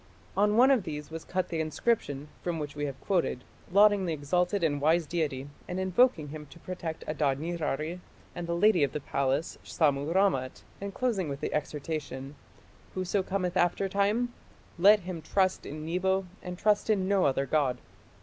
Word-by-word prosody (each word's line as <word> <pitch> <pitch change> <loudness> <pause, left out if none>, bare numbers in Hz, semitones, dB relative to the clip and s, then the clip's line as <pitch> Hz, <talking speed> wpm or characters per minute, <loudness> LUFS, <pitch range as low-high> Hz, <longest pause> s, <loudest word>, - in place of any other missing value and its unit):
On 210 +2 +3
one 260 +3 +7
of 260 -5 +4
these 150 -4 -6
was 165 0 -6
cut 185 0 -2
the 165 - -2
inscription, 155 -3 -1
from 175 -2 -2
which 150 -2 -5
we 145 0 -2
have 135 -2 -5
quoted, 175 -9 0 0.3
lauding 200 -1 +5
the 165 - 0
exalted 180 +6 0
and 145 -3 +1
wise 160 +3 +3
deity 150 -5 -2 0.2
and 180 - -3
invoking 190 - +3
him 150 0 -8
to 135 - -14
protect 170 -2 -6
Adad 145 -3 +1
nirari 160 0 -2 0.3
and 175 -1 -5
the 170 - -1
lady 195 -1 +4
of 140 - 0
the - - -2
palace, 140 +3 -1
Sammu 145 -1 +1
rammat, 175 -9 +1 0.2
and 200 0 -4
closing 200 -7 -1
with 140 0 -4
the - - -3
exhortation, 150 -2 -4 0.6
"Whoso 185 +1 0
cometh 185 -1 -2
in 185 - +5
after 175 +3 +1
time, 210 +5 +1 0.5
let 205 +3 +7
him 175 -2 -6
trust 190 +2 0
in 155 +1 -6
Nebo 190 +3 0 0.2
and 180 0 -6
trust 210 +2 +2
in 195 -3 +2
no 195 -1 +3
other 135 0 +2
god". 140 -3 +1
170 Hz, 180 wpm, -29 LUFS, 150-190 Hz, 0.6 s, one